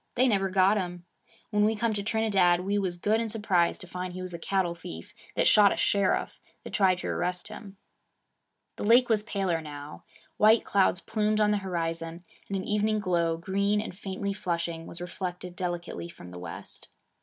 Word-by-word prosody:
They 255 +1 +4
never 195 -4 +2
got 190 +2 +4
him. 175 -2 -4 0.5
When 210 -1 +3
we 220 +1 +3
come 225 +1 0
to 205 - -2
Trinidad, 200 -5 +2
we 200 +2 0
was 180 -3 -2
good 215 +5 +1
and 225 -2 -3
surprised 195 -6 +1
to - - -8
find 180 0 -5
he 185 - -6
was 185 -1 -7
a 170 - -5
cattle 185 -1 0
thief 85 - -9 0.2
that - - +3
shot 205 -2 +7
a - - -2
sheriff 200 -2 +1 0.2
that - - -9
tried 190 -3 +4
to - - -5
arrest 180 +3 -2
him.' 205 -2 -10 1.0
The - - -4
lake 240 +4 +5
was 220 -2 +4
paler 195 -6 -1
now. 145 -1 -9 0.3
White 220 +2 +5
clouds 190 -2 +3
plumed 215 -1 0
on 210 -1 +4
the 210 - +2
horizon, 165 -3 -3 0.3
and 200 - -2
an 190 - -3
evening 210 +1 +1
glow, 170 -4 +1
green 200 +4 0
and 210 -4 -5
faintly 200 0 -4
flushing, 170 -4 -3
was 170 - -7
reflected 180 0 -5
delicately 175 -1 -4
from 90 - -12
the 90 - -8
west. 90 - -9
190 Hz, 190 wpm, -28 LUFS, 175-210 Hz, 1.0 s, shot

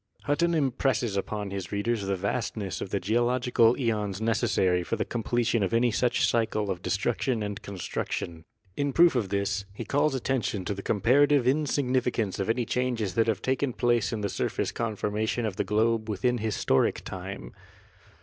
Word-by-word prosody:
Hutton 170 +4 +1
impresses 125 -6 0
upon 100 0 -3
his 95 -3 -5
readers 105 +2 0
the 100 - +1
vastness 100 0 -3
of - - -4
the 100 - -1
geological 120 +3 +2
eons 105 -5 -1
necessary 110 -5 +1
for 85 - -2
the - - -2
com 120 - -3
pletion 115 -1 +1
of 95 +4 0
any 120 +1 +3
such 120 +2 +2
cycle 110 -3 0
of 90 -2 -4
destruction 115 +4 -1
and 105 -1 -4
construction. 85 -3 -4 0.3
In 140 -1 -1
proof 170 0 +6
of 115 -7 -1
this, 100 0 -1
he 115 - -5
calls 145 0 +1
attention 120 -7 -1
to 100 - -1
the 100 - -6
comparative 130 +6 +3
in 150 +3 +2
significance 125 -7 0
of 95 - -1
any 120 +1 +1
changes 120 -5 -1
that 115 -1 +2
have 110 -2 -1
taken 130 0 0
place 120 -2 +1
in 110 -2 -3
the 100 - 0
surface - - -2
conformation 110 +1 -2
of 105 -4 -3
the - - +1
globe 110 +1 +1
within 120 +4 0
historic 105 -10 +1
time. 95 -9 -7
115 Hz, 175 wpm, -27 LUFS, 100-125 Hz, 0.3 s, proof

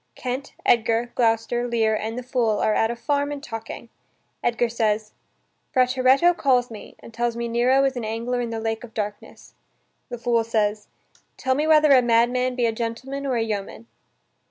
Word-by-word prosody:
Kent, 260 +3 -5
Edgar, 230 +1 +2
Gloucester, 235 +1 +1
Lear, 225 -2 +1
and 220 +2 -4
the 250 - -4
fool 240 -4 0
are 215 - +1
at 225 - +2
a 235 - -3
farm 285 +4 -1
and 290 -1 -6
talking. 225 -2 -7 0.5
Edgar 240 0 +1
says: 215 -2 -1 0.6
"Frateretto 260 +6 +4
calls 250 -6 +1
me, 215 - -10
and 230 - -13
tells 235 0 -1
me 235 0 -3
Nero 245 +4 +3
is 270 -1 +1
an 245 - -4
angler 230 +3 -2
in 235 - -3
the 225 -1 -4
lake 225 0 -3
of 225 -2 -12
darkness...." 210 -1 -6 0.6
The 245 - -5
fool 235 0 +1
says: 215 -2 -1 0.5
"Tell 260 - 0
me 300 +4 0
whether 305 -2 +5
a 260 -2 +7
madman 245 +2 +2
be 245 -1 +1
a 230 - +2
gentleman 255 +5 -4
or 260 - 0
a 230 - +1
yeoman?" 215 0 -5
235 Hz, 180 wpm, -23 LUFS, 225-255 Hz, 0.6 s, a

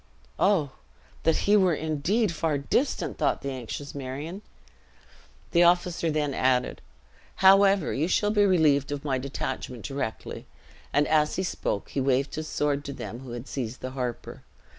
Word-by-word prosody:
"Oh! 175 -9 +3 0.5
That 160 -1 +3
he 205 - +5
were 185 -5 +4
indeed 160 +8 0
far 160 -2 0
distant!" 190 - -1
thought - - 0
the 140 - -2
anxious 130 +2 -6
Marion. 145 +8 -6 1.1
The 170 - +4
officer 175 -1 +3
then 150 -2 0
added, 125 -1 +1 0.5
"However, 195 -2 +5
you 155 +4 0
shall 205 +3 +2
be 210 -1 +3
relieved 155 -8 +3
of 145 0 -4
my 135 -3 0
detachment 130 -2 -5
directly." 135 -5 -5 0.4
And 145 0 +2
as 150 -1 +2
he 185 - -1
spoke, 105 - -3
he 140 - -2
waved 135 +1 +1
his 155 0 -4
sword 145 -1 -1
to 140 - -5
them 120 -3 -7
who 130 -2 -9
had 120 +3 -7
seized 125 -3 -5
the 130 - -5
harper. 125 -3 -5
145 Hz, 160 wpm, -27 LUFS, 130-175 Hz, 1.1 s, he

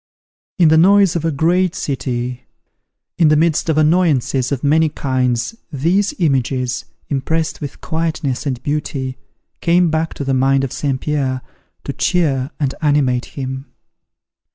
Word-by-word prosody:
In 170 -4 +5
the 160 0 +5
noise 195 0 +5
of 165 - -1
a 165 - +1
great 170 +5 +1
city, 125 -2 -3 0.7
in 165 - +5
the 155 - +5
midst 160 +1 +1
of 155 - +1
annoyances 155 -5 +2
of 135 -3 -2
many 155 +2 +3
kinds 125 - -1 0.2
these 175 +8 +1
images, 130 -5 0 0.2
impressed 160 +4 -1
with 145 - -7
quietness 160 -4 -2
and 130 -2 -3
beauty, 140 -3 -3 0.4
came 175 0 +3
back 160 +1 -1
to - - -4
the 135 -1 0
mind 135 +1 +2
of 135 - -3
St. 135 -3 -1
Pierre, 135 -4 -1 0.4
to - - -4
cheer 140 -7 +1
and 140 -3 0
animate 140 -5 +2
him. 130 0 -4
145 Hz, 145 wpm, -18 LUFS, 130-160 Hz, 0.7 s, In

